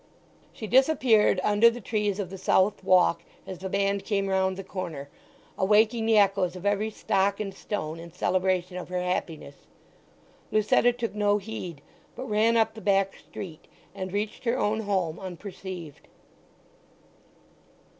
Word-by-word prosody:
She 220 - -8
disappeared 250 -5 +4
under 210 +3 +5
the 235 +1 -6
trees 210 -2 -1
of 190 -3 -4
the 195 - -6
south 190 +2 +2
walk 180 -2 +4 0.2
as 185 -3 -7
the 190 +1 -5
band 200 0 0
came 200 -1 0
round 190 0 +1
the 195 - -6
corner, 170 -7 -6 0.5
awaking 220 +3 +3
the 225 -1 +4
echoes 195 -3 +3
of 185 +1 -9
every 205 +2 +1
stock 200 -1 0
and 200 -2 -4
stone 165 -7 -5
in 170 0 -10
celebration 180 0 0
of 180 - -7
her 180 0 -2
happiness. 165 -5 -4 0.8
Lucetta 215 +3 +3
took 235 -2 -4
no 205 -1 +2
heed, 185 -7 -7 0.3
but - - -6
ran 220 +2 +3
up 225 0 +2
the 220 - -10
back 195 -1 +2
street 170 -4 -10 0.3
and 185 -1 -5
reached 205 +4 -3
her 235 +2 +1
own 215 -2 0
home 190 -6 -1
unperceived. 185 -3 -8
195 Hz, 150 wpm, -27 LUFS, 185-215 Hz, 0.8 s, under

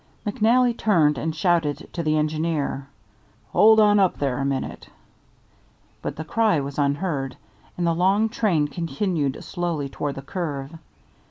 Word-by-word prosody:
McNally 235 +4 +3
turned 155 - +2
and 160 +4 -2
shouted 165 -3 0
to 170 - -2
the 155 -1 +1
engineer, 155 -3 -1 0.6
"Hold 220 +1 +6
on 210 -1 +5
up 190 -2 +2
there 135 -3 -1
a - - -1
minute"; 135 -1 -3 1.1
but - - -4
the 160 - -6
cry 215 0 +2
was 140 +1 -5
unheard, 140 -2 -1 0.4
and 175 - 0
the 170 - +2
long 195 +6 +2
train 195 -9 +1
continued 160 -1 -2
slowly 170 -6 -3
toward 140 +1 -4
the 135 - -7
curve. 145 -2 -4
160 Hz, 145 wpm, -23 LUFS, 145-190 Hz, 1.1 s, Hold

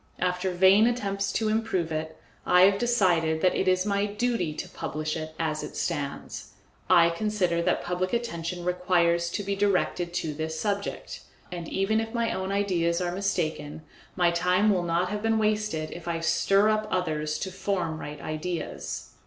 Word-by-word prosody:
After 180 +1 0
vain 190 +5 +5
attempts 200 -5 -1
to 220 - 0
improve 215 -6 0
it, 160 0 -4 0.2
I 180 - +5
have 195 +1 +5
decided 175 -10 +2
that 185 - +3
it 190 - -1
is 185 0 +3
my 200 0 +1
duty 210 -5 -1
to 150 - -6
publish 155 0 -4
it 155 -1 -6
as 155 -2 -1
it - - -7
stands. 140 -1 -4 0.4
I 170 -2 +6
consider 180 -2 0
that - - 0
public 180 +1 -2
attention 175 -7 -3
requires 175 -1 +2
to 205 - -3
be 200 0 -2
directed 190 -3 0
to 155 -3 -2
this 160 +1 -4
subject, 200 -1 -3 0.3
and 170 -2 -6
even 195 +3 +1
if 225 +1 -6
my 230 -1 0
own 190 +1 -3
ideas 180 -4 +1
are 175 -1 -1
mistaken, 155 -5 -2 0.3
my 175 -2 +3
time 180 +4 +3
will 185 -3 +2
not 175 +1 0
have 210 0 -3
been 225 0 +2
wasted 210 -7 0
if 175 0 -9
I 170 -1 -1
stir 195 +5 +3
up 215 0 +1
others 155 -5 -1
to 190 - -4
form 185 -4 -2
right 150 0 -7
ideas. 155 +4 -5
180 Hz, 175 wpm, -27 LUFS, 165-200 Hz, 0.4 s, I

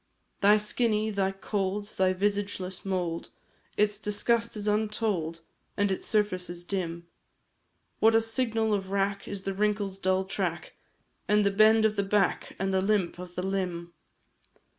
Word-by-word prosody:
Thy 205 +2 +6
skinny, 215 0 0
thy 195 -2 0
cold, 200 +1 -2
thy 190 -2 +1
visageless 200 -1 -2
mould, 180 -4 -2 0.5
Its 210 0 +2
disgust 225 +2 0
is 210 0 -4
untold, 210 -6 0 0.4
and 205 -1 +2
its 190 - -3
surface 205 -4 0
is 175 0 -6
dim; 170 -2 -3 0.9
What 225 +1 +5
a 225 - +5
signal 225 -1 0
of 195 -2 -2
wrack 200 0 -1
is 200 -1 -6
the 195 - -2
wrinkle's 205 -1 -1
dull 190 0 +1
track, 175 -4 -3 0.5
And 210 0 +3
the 200 - +3
bend 220 +2 +5
of 215 -1 +1
the 200 - +2
back, 200 0 0
and 195 0 -1
the 190 - +3
limp 195 -3 0
of 180 -1 -9
the 180 - -2
limb! 180 -3 -3
200 Hz, 155 wpm, -28 LUFS, 185-210 Hz, 0.9 s, Thy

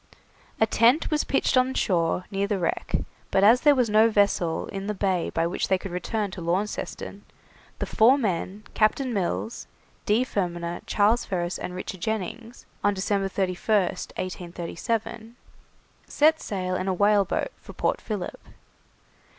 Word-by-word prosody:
A 220 - +5
tent 240 +9 +3
was 300 -1 +2
pitched 275 - +1
on 255 +1 +3
shore 175 -1 +1
near 200 0 0
the 205 -1 0
wreck, 175 -3 -2 0.3
but 195 - +2
as 230 +5 +6
there 295 -2 +6
was 250 -3 +2
no 215 +1 +5
vessel 200 -6 +1
in 195 0 -5
the 210 - -2
bay 190 -3 0
by 165 - 0
which 170 - -1
they 190 - +3
could 195 0 -7
return 200 +3 -2
to 185 - -7
Launceston, 185 +5 -3 0.5
the - - -2
four 245 +5 +5
men, 200 -3 -2
Captain 240 +4 +1
Mills, 200 +3 -2 0.4
D. 220 +5 +3
Fermaner, 175 -5 -3
Charles 215 +3 +3
Ferris, 175 -1 -2
and 180 - -5
Richard 185 0 -6
Jennings, 220 +3 -4 0.2
on 205 0 +2
December 195 0 0
31st, 190 +1 0
1837, 185 +6 -4 0.7
set 315 +2 +3
sail 185 -2 -3
in 185 +1 -2
a 190 - +1
whaleboat 205 - +2
for - - -12
Port - - -1
Philip. 205 -5 -5
200 Hz, 150 wpm, -25 LUFS, 185-225 Hz, 0.7 s, as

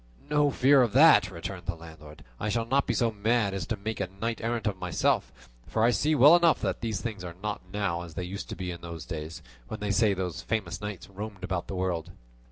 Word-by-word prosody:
"No 150 -1 +4
fear 135 +1 +5
of 120 -4 +1
that," 145 - +7
returned 90 +1 -7
the - - -1
landlord; 80 -2 -13 0.2
"I 105 - -2
shall 115 +2 0
not 135 +4 +1
be - - 0
so 115 -2 +2
mad 110 -1 +1
as 95 -5 -4
to - - -2
make 110 +3 -4
a 95 -2 -2
knight 115 0 -2
errant 115 0 -2
of 100 -3 -1
myself; 90 -2 0 0.4
for 110 - 0
I 120 - +5
see 155 +5 +2
well 145 +5 +8
enough 170 -2 +4
that 95 -3 -2
things 110 -2 -3
are 85 -2 -7
not 105 -1 -3
now 100 -4 -1
as 85 -2 -10
they 90 - -3
used 95 +3 -6
to - - -5
be 90 -1 -4
in 85 -1 -8
those 85 -2 -7
days, 80 0 -6 0.2
when 110 - -6
they 105 -1 -2
say 105 -1 +3
those 90 -3 -3
famous 100 -1 -3
knights 105 -4 -6
roamed 100 0 -8
about 95 -2 -2
the 95 - -5
world." 90 -2 -2
100 Hz, 235 wpm, -28 LUFS, 90-115 Hz, 0.4 s, well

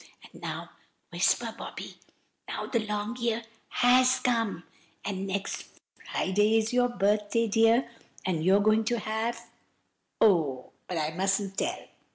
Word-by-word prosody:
And - - -14
now,—whisper, - - -2
Bobby! - - -7 0.5
now - - -4
the 235 - 0
long 210 +2 -3
year 235 -1 -1 0.3
has 255 +1 +4
come, 230 -9 0 0.4
and 195 -1 -3
next 195 0 -4 0.3
Friday 210 +4 +2
is 220 +1 0
your 245 0 +3
birthday, 210 +1 +1
dear, 225 +3 +4 0.4
and 170 -4 0
you 190 +3 +5
are - - +5
going 215 +1 +4
to 240 +1 +1
have—oh! 220 - -2 0.2
but 180 - -3
I 155 0 0
mustn't 195 +3 0
tell!" - - -2
215 Hz, 130 wpm, -28 LUFS, 195-235 Hz, 0.5 s, you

